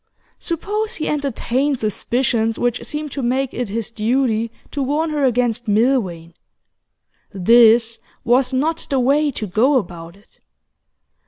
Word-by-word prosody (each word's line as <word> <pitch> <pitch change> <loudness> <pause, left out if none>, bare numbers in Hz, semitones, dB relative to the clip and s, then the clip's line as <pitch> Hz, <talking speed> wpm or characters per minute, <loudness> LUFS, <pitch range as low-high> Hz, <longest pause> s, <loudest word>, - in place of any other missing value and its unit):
Suppose 420 +7 -3
he 310 - -3
entertained 280 -1 -1
suspicions 225 +1 -1
which 245 0 -1
seemed 300 -1 -5
to 275 - -4
make 260 +2 -1
it 245 -4 -3
his 225 +2 -4
duty 230 0 0 0.2
to 285 - -3
warn 300 +4 -1
her 295 -2 -1
against 240 -2 0
Milvain, 205 -7 0 1.0
this 230 +3 +4 0.2
was 250 +2 +2
not 310 +5 -1
the 270 - +1
way 285 +4 +2
to 235 -5 -4
go 225 +9 +2
about 170 -6 -6
it. 200 - -25
245 Hz, 135 wpm, -19 LUFS, 220-280 Hz, 1.0 s, this